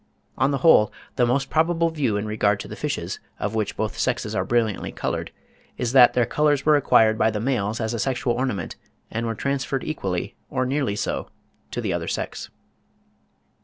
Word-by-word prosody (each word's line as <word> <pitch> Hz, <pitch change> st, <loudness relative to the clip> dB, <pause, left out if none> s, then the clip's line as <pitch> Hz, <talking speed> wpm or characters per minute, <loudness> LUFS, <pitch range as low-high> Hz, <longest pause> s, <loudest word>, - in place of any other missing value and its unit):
On -, -, +2 dB
the 140 Hz, -, 0 dB
whole, 105 Hz, -10 st, +6 dB, 0.2 s
the 120 Hz, -, +3 dB
most 135 Hz, +3 st, 0 dB
probable 165 Hz, +1 st, +2 dB
view 135 Hz, -10 st, 0 dB
in 105 Hz, -, -2 dB
regard 105 Hz, -1 st, +1 dB
to -, -, -8 dB
the -, -, -7 dB
fishes, -, -, -3 dB, 0.2 s
of 105 Hz, -, -2 dB
which 110 Hz, -2 st, -2 dB
both 110 Hz, 0 st, -2 dB
sexes 120 Hz, -4 st, -1 dB
are 95 Hz, -, 0 dB
brilliantly 110 Hz, 0 st, 0 dB
coloured, -, -, -3 dB, 0.5 s
is 120 Hz, -1 st, -1 dB
that 125 Hz, -2 st, +7 dB
their 120 Hz, -1 st, +3 dB
colours 145 Hz, +2 st, +1 dB
were 155 Hz, 0 st, +6 dB
acquired 110 Hz, -6 st, +4 dB
by 110 Hz, -, +4 dB
the 105 Hz, -1 st, -2 dB
males 110 Hz, -3 st, -1 dB
as 110 Hz, 0 st, -1 dB
a 115 Hz, -, -2 dB
sexual 125 Hz, 0 st, 0 dB
ornament, 120 Hz, -9 st, -2 dB, 0.4 s
and 115 Hz, +1 st, -2 dB
were 115 Hz, -, -2 dB
transferred 135 Hz, +1 st, -2 dB
equally, 95 Hz, -, -3 dB, 0.2 s
or 130 Hz, -3 st, 0 dB
nearly 130 Hz, -5 st, 0 dB
so, -, -, -3 dB, 0.4 s
to -, -, -4 dB
the -, -, -1 dB
other -, -, -3 dB
sex. -, -, -4 dB
120 Hz, 190 wpm, -24 LUFS, 105-135 Hz, 0.5 s, that